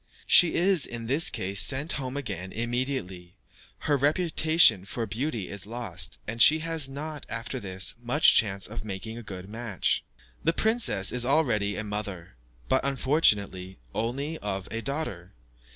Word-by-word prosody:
She 175 - +6
is, 180 -4 +4
in 115 -1 -5
this 140 +7 +3
case, 95 +1 -1
sent 140 +4 +1
home 130 -1 -3
again 95 -9 -5
immediately, 120 -7 -4 0.5
her 145 - +1
reputation 155 - +3
for 115 +4 -4
beauty 115 -1 -3
is 100 0 -4
lost, 105 -7 -5
and 115 +2 -3
she 155 - +8
has 160 -4 -1
not, 150 +2 -7
after 115 +3 -4
this, 95 -4 -3
much 125 +6 +4
chance 100 -4 +3
of 110 0 -6
making 110 +3 -6
a - - -8
good 95 -4 -9
match. 110 -2 -1 0.4
The 165 - +2
princess 220 - +2
is 125 -1 0
already 120 -7 +1
a 110 - -3
mother, 105 - -6 0.3
but, - - +1
unfortunately, 105 - +1 0.2
only 140 +8 -3
of 95 -2 -4
a 115 +1 -3
daughter. 115 - -4
115 Hz, 150 wpm, -27 LUFS, 100-145 Hz, 0.5 s, she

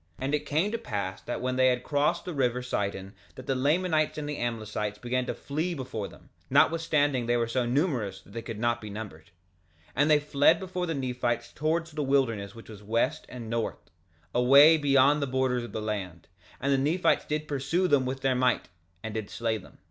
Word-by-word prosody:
2:35 130 - -4
And 140 - -1
it 150 - 0
came 160 +8 +1
to 230 - -1
pass 100 -5 -4
that 120 - -4
when 130 0 -1
they 130 0 +5
had 125 -1 +3
all - - -22
crossed 150 +4 +1
the 180 - -4
river 125 -3 0
Sidon 100 -5 -3 0.2
that 130 - -10
the 135 - 0
Lamanites 155 +3 +1
and 150 -1 -4
the 150 - -4
Amlicites 110 -3 -3
began 125 +2 -1
to - - -2
flee 160 +5 -3
before 120 -7 -4
them, - - -17 0.2
notwithstanding 145 -5 +3
they 120 0 +2
were 115 -1 0
so 120 +1 0
numerous 125 - 0
that 100 - -18
they 115 - -4
could 115 -2 -6
not 120 +1 0
be 105 - -7
numbered. 100 -6 -8 0.6
2:36 - - -25
And 145 +2 +3
they 150 -1 +6
fled 145 +3 +3
before 180 -1 -3
the 165 - -2
Nephites 125 -3 -2
towards 160 +2 -1
the 150 0 -3
wilderness 115 -8 0
which 115 - -12
was 105 -2 -10
west 110 +3 -1
and 120 -3 -8
north, 115 -4 -3 0.4
away 140 +6 +7
beyond 145 -1 +4
the 140 - 0
borders 130 -1 0
of 120 - -8
the - - -4
land; 95 -6 -4 0.3
and 140 0 +1
the 135 - +2
Nephites 155 +7 +2
did 150 0 -2
pursue 145 +6 0
them 145 -5 +3
with 135 +1 -4
their 135 -1 +2
might, 125 -1 +1 0.3
and 110 -1 -5
did 110 -2 -4
slay 115 -1 -1
them. - - -16
130 Hz, 215 wpm, -28 LUFS, 115-150 Hz, 0.6 s, away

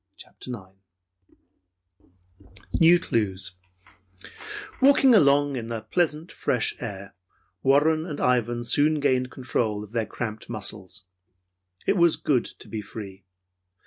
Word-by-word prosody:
CHAPTER - - -11 0.8
IX - - -31 1.4
NEW 170 +1 +7
CLUES 100 - -1 1.3
Walking 270 -1 +6
along 145 -6 +4
in 115 -3 -4
the 115 -1 -4
pleasant, 160 +6 -1
fresh 125 - 0
air, 100 -4 -7 0.5
Warren 155 +4 +3
and 150 -4 -5
Ivan 120 -1 +1
soon 150 +5 +2
gained 130 -3 +1
control 115 -4 -2
of 105 - -12
their 115 -3 -1
cramped 110 -1 -6
muscles. 100 -3 -4 0.8
It 200 - +2
was 170 -2 +5
good 130 -5 +1
to - - -11
be 110 - -5
free. 100 -2 -10
125 Hz, 115 wpm, -25 LUFS, 110-150 Hz, 1.4 s, NEW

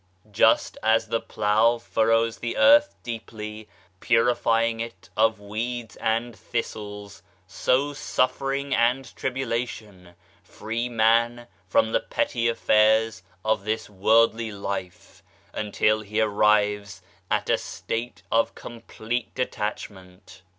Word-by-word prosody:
Just 110 +2 +3
as 110 +1 +2
the 115 - +1
plough 110 +3 +2
furrows 115 0 +1
the 115 - -4
earth 295 +1 +6
deeply, 110 -2 -7 0.3
purifying 115 0 +2
it 95 -5 -8
of 110 0 +2
weeds 115 +3 -5
and 115 +1 -1
thistles, 105 -3 -6 0.2
so 140 +3 0
suffering 135 0 -1
and 125 +2 +1
tribulation 115 -8 -4 0.3
free 115 +6 -4
man 115 +1 +2 0.2
from 110 +4 +2
the - - +2
petty 115 0 -1
affairs 110 -1 +3 0.2
of 110 -2 +1
this 110 0 -3
worldly 110 +3 +3
life 100 -3 -6 0.3
until 110 +1 +1
he 105 +1 -3
arrives 105 -2 +1 0.3
at - - 0
a - - +2
state 115 +2 -5
of 115 0 +2
complete 115 0 -6
detachment. 100 -7 -5
110 Hz, 110 wpm, -25 LUFS, 105-115 Hz, 0.3 s, earth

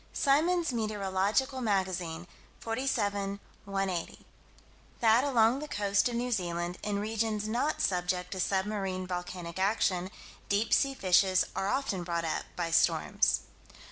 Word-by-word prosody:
Symons' 325 +2 +2
Meteorological 215 +4 0
Magazine, 185 -6 -1 0.3
47 205 -5 -1 0.3
180: 195 -3 -3 0.7
That, 230 +1 +5
along 245 -2 +3
the 300 - -6
coast 200 -1 +1
of 240 - -4
New 245 +1 -1
Zealand, 175 -4 -2
in 205 -1 -2
regions 215 0 -1
not 250 +8 0
subject 180 -1 0
to 190 - -4
submarine 190 -1 -1
volcanic 180 -1 -5
action, 190 -2 +1 0.4
deep 205 +3 +1
sea 275 0 +3
fishes 185 -2 +3
are 195 - -1
often 205 -7 -1
brought 170 -1 -2
up 160 - -2
by 170 -2 -2
storms. - - +2
200 Hz, 125 wpm, -30 LUFS, 185-230 Hz, 0.7 s, That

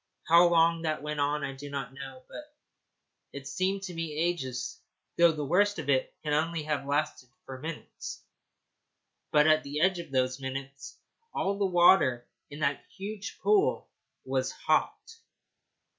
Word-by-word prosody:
How 170 +2 +7
long 165 -1 +3
that 155 -2 -2
went 150 0 -3
on 145 +1 0
I 135 -1 -3
do 145 +2 -9
not 140 -2 -5
know, 135 -1 -9
but 300 0 -11 0.8
it 140 -1 -7
seemed 190 +6 -1
to 185 -2 -5
me 165 -2 -4
ages; 135 -7 -2 0.4
though 170 -1 +6
the 150 -2 -4
worst 205 +7 +2
of 150 -4 -5
it 130 -1 +1
can 150 -1 -1
only 160 +1 0
have 150 -2 -2
lasted 145 -3 -1 0.2
for 130 -1 -8
minutes. 160 +2 -7 1.1
But 150 0 +5
at 155 0 +5
the 145 +1 -4
end 185 +2 +3
of 170 - -7
those 130 0 0
minutes 135 +1 -6 0.4
all 195 +1 0
the 200 - +2
water 175 -9 +4 0.2
in 145 +1 -9
that 140 -1 0
huge 200 +1 -6
pool 420 +1 +2 0.4
was 130 0 -1
hot. - - 0
150 Hz, 160 wpm, -29 LUFS, 135-170 Hz, 1.1 s, How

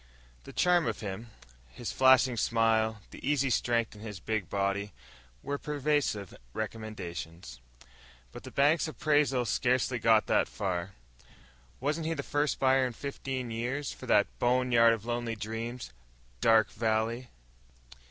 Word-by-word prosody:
The - - -9
charm 175 -2 +3
of - - -3
him, 105 +3 -6 0.4
his - - -6
flashing 130 -1 +5
smile, 110 -1 +1
the - - -12
easy 140 -2 +1
strength 115 -1 +1
in 105 - -13
his 105 -4 -7
big 110 -2 -2
body, 100 +1 -1 0.5
were 145 0 -3
persuasive 145 - -1 0.2
recommendations. 90 - -6 0.7
But - - -9
the - - -9
bank's 145 +3 +3
appraisal 145 -5 +1
scarcely 125 +2 +1
got 110 -1 +4
that - - +2
far. 95 -1 -3 0.9
Wasn't 155 +4 -1
he 165 - -1
the 140 - -4
first 145 +1 0
buyer 130 -1 +3
in 125 - -6
fifteen 130 -1 -5
years 125 +5 -3
for - - -11
that - - +5
bone 125 +1 +2
yard 115 -1 +6
of 115 -1 -5
lonely 120 -1 -2
dreams, 115 - -5 0.5
Dark 110 - +4
Valley? 115 +3 -1
115 Hz, 140 wpm, -30 LUFS, 110-135 Hz, 0.9 s, yard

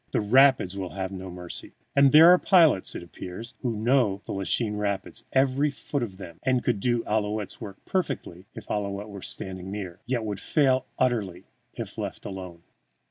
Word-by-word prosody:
The - - +2
rapids 120 -3 +4
will 95 -2 -5
have 95 -1 -3
no 95 -1 -7
mercy. 90 -1 -7 0.2
And 140 -1 +6
there 160 +3 +9
are 180 - +6
pilots, 165 - +4
it - - -5
appears, 90 +7 -9
who 120 -3 -2
know 110 -3 +2
the - - -6
Lachine 105 +2 0
Rapids, 100 -2 -3
every 135 +2 +2
foot 140 0 -4
of 100 -6 -4
them, 85 -4 -10
and 130 -2 +1
could 100 - 0
do 120 +2 +1
Ouillette's 105 -1 -2
work 100 -1 -9
perfectly 100 - -3
if - - -9
Ouillette 100 0 -3
were 100 -1 -8
standing 95 0 -4
near, 95 -3 -6
yet 120 -3 -1
would 100 -3 -3
fail 130 -2 +2
utterly 105 -8 0 0.3
if - - -7
left - - -5
alone. 90 -4 -7
105 Hz, 180 wpm, -26 LUFS, 95-130 Hz, 0.3 s, there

